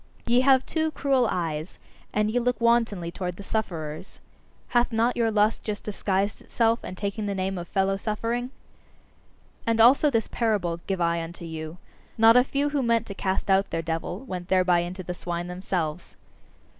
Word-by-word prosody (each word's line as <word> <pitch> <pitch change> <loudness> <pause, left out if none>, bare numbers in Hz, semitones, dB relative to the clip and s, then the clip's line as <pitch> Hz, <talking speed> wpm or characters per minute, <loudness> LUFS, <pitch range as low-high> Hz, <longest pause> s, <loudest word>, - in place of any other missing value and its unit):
Ye 240 +1 +4
have 260 -1 +4
too 315 -1 0
cruel 270 -5 +1
eyes, 160 -1 -3 0.3
and 210 0 +1
ye 245 - +1
look 245 +1 0
wantonly 230 -7 +2
towards 180 -1 -4
the 200 - -8
sufferers. 170 -6 -4 0.5
Hath 240 0 +2
not 230 +2 +2
your 230 -2 +2
lust 215 0 +2
just 210 -2 -4
disguised 200 -1 -1
itself 230 0 +1
and 185 - -7
taken 205 +1 -3
the 200 - -2
name 190 0 -1
of 175 - -7
fellow 195 +1 +1
suffering? 230 +4 -2 1.2
And 230 0 +2
also 260 +6 +6
this 230 -5 0
parable 200 -8 0
give 190 -2 -1
I 170 0 +1
unto 170 +1 -7
you: 160 0 -6 0.4
Not 225 +1 +7
a 250 - +7
few 280 +2 -1
who 285 -1 0
meant 230 -2 +2
to 200 - -7
cast 195 0 -1
out 195 +1 +3
their 165 0 -2
devil, 165 +4 -3
went 185 -9 -6
thereby 185 -2 +3
into 180 +2 -4
the 180 - -4
swine 175 0 -4
themselves. 180 -2 -4
200 Hz, 180 wpm, -26 LUFS, 175-235 Hz, 1.2 s, Not